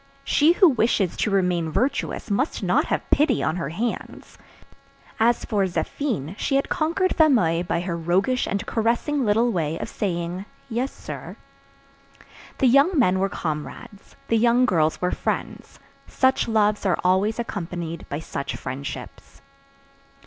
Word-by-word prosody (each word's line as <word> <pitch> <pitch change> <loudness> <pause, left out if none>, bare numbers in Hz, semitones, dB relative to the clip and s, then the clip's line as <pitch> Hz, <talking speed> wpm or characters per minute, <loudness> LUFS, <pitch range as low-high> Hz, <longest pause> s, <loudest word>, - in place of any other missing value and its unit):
She 310 +3 +4
who 370 +1 +6
wishes 225 - +1
to - - 0
remain 180 -4 +1
virtuous 245 - -1
must 260 +10 -1
not - - +2
have - - -2
pity 285 -4 +3
on 160 - 0
her 170 -5 -3
hands. 220 +9 -5 0.8
As 235 +1 +2
for 205 -2 +1
Zéphine, 180 - -3
she 275 - 0
had 275 - +1
conquered 340 +4 0
Fameuil 220 - +3
by 175 -1 -1
her 175 -1 -3
roguish 185 +10 +1
and 200 - -2
caressing 240 +6 0
little 225 +2 +2
way 165 -5 -1
of - - -5
saying 175 -1 -3 0.2
"Yes, 245 +4 -1
sir." - - -8 1.2
The - - +1
young 280 +8 +4
men 190 -8 +3
were 195 +1 +1
comrades; 180 +7 -6
the 230 - +2
young 240 +2 +4
girls 160 -7 +1
were 180 - 0
friends. - - -4 0.3
Such 260 -1 +1
loves 215 -2 +2
are 190 -4 +2
always 190 +4 +2
accompanied 175 -7 -5
by 145 +2 -4
such 140 -3 -5
friendships. 135 +2 -8
205 Hz, 145 wpm, -23 LUFS, 170-245 Hz, 1.2 s, who